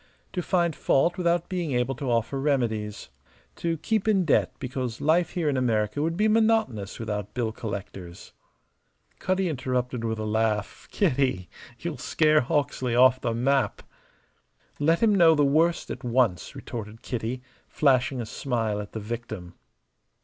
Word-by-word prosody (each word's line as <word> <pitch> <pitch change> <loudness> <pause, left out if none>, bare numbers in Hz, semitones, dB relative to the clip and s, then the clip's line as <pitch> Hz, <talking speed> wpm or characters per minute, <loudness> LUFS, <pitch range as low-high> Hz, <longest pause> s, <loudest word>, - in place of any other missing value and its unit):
To 180 - -1
find 170 -3 +1
fault 155 +6 +2
without 175 -1 +1
being 175 -6 -2
able 125 +2 0
to 135 0 -4
offer 120 +3 0
remedies. 110 - -1 0.5
To 165 -1 -1
keep 220 +6 -1
in 195 -4 +3
debt 155 - +2
because 125 -3 -4
life 165 +4 +2
here 170 -4 -1
in 145 - +1
America 110 0 0
would 165 +2 -1
be 210 +2 +3
monotonous 220 - +1
without 105 -2 -4
bill 120 -3 -1
collectors." 100 -5 -7 0.9
Cutty 185 0 0
interrupted 125 -4 -2
with 110 -1 -1
a 110 - -3
laugh. 110 -1 -1
"Kitty, 125 -9 0 0.3
you'll 165 -3 -5
'scare 155 +2 +3
Hawksley 130 -2 -1
off 130 +1 +5
the 115 -2 -1
map!" 135 +3 +1 1.0
"Let 165 +7 +2
him 220 -2 +5
know 170 -4 +6
the 145 -1 +3
worst 160 +5 +2
at - - -7
once," 120 -7 0
retorted 110 -1 -7
Kitty, 125 +1 -4 0.2
flashing 130 -2 +2
a 120 - -3
smile 115 -3 -2
at 105 - -10
the 110 - -4
victim. 110 -5 -6
130 Hz, 150 wpm, -26 LUFS, 110-160 Hz, 1.0 s, know